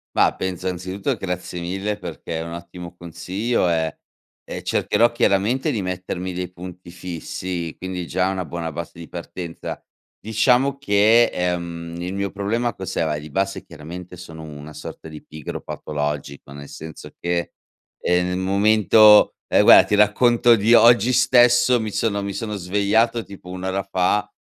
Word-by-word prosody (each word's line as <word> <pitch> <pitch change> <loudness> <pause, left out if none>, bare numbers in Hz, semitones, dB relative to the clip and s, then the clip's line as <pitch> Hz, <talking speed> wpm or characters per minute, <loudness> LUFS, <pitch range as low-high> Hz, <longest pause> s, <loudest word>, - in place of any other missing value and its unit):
Ma - - +3
penso, 95 -1 -4
anzitutto, 95 +2 -3
grazie 90 -1 -5
mille, 95 +4 -3
perché 85 -3 -6
è - - -3
un 85 0 -7
ottimo 85 0 -9
consiglio, 90 +5 -2
ehm, 80 -2 0 0.6
e - - -6
cercherò, 120 +1 +2
chiaramente, 120 +5 +1
di 110 -6 -2
mettermi 90 0 -4
dei 90 0 -5
punti 90 0 -10
fissi, 90 -1 -5
quindi 90 -2 -5
già 95 +1 0
è - - -1
una 90 -2 -3
buona 85 0 -5
base 85 +2 -7
di 85 -1 -11
partenza. 85 -1 -7 0.4
Diciamo 125 +5 +2
che, 110 -1 +4
ehm, 85 -1 -3
il 90 +2 -4
mio 100 0 -2
problema, 115 +4 -1
cos'era? 80 -5 -2
Di 75 +1 -10
base, 95 +5 -2
chiaramente, 90 +4 -10
sono 80 -3 -10
una 75 0 -10
sorta 80 +1 -9
di 75 -1 -11
pigro 75 -3 -7
patologico, 75 -2 -5
nel 70 0 -10
senso 80 0 -10
che, 85 0 -2 0.5
ehm, 90 0 +1
nel 90 0 -2
momento 105 +2 +5 0.2
ehm, - - +4
guarda, - - +9
ti 105 - +2
racconto 120 +3 +4
di 110 +3 +3
oggi 120 0 +6
stesso: 120 -1 +5
mi 110 -1 -3
sono 100 -2 -1
mi 100 -1 -4
sono 105 -1 -4
svegliato 105 +5 +1
tipo 95 -3 -12
1 90 0 -7
ora 95 +1 -1
fa, 100 +2 0
95 Hz, 160 wpm, -22 LUFS, 85-105 Hz, 0.6 s, guarda